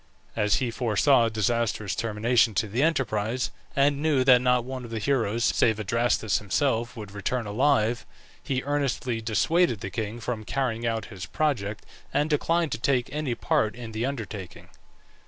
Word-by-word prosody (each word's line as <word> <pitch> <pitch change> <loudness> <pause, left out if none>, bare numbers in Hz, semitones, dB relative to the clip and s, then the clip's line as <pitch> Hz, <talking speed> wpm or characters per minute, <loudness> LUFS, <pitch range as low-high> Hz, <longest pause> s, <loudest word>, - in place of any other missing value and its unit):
As 105 -2 +2
he 125 -3 -1
foresaw 120 +2 +3
a - - -1
disastrous 110 -2 0
termination 115 0 +1
to 110 +3 +1
the 115 +6 -1
enterprise, 125 -6 0 0.2
and 140 +1 +2
knew 150 -4 +2
that 125 -2 +6
not 125 -1 +2
one 130 0 -6
of 120 - -8
the 115 - -4
heroes, 115 -1 0
save 110 -2 +2
Adrastus 115 0 +1
himself, 120 +2 -1
would 105 -3 -8
return 110 +4 -2
alive, 120 +1 +1 0.4
he 130 -1 -2
earnestly 135 -5 -1
dissuaded 115 - +1
the 95 - -5
king 110 +3 -4
from 115 -2 -4
carrying 120 -1 -2
out 115 -1 -1
his 90 -2 -7
project, 110 -9 -1 0.3
and 150 +2 0
declined 165 +1 +1
to 110 - -2
take 125 0 0
any 150 -5 -2
part 110 -2 0
in 120 -2 -8
the 110 +1 -3
undertaking. 105 -9 -7
120 Hz, 165 wpm, -26 LUFS, 110-135 Hz, 0.4 s, that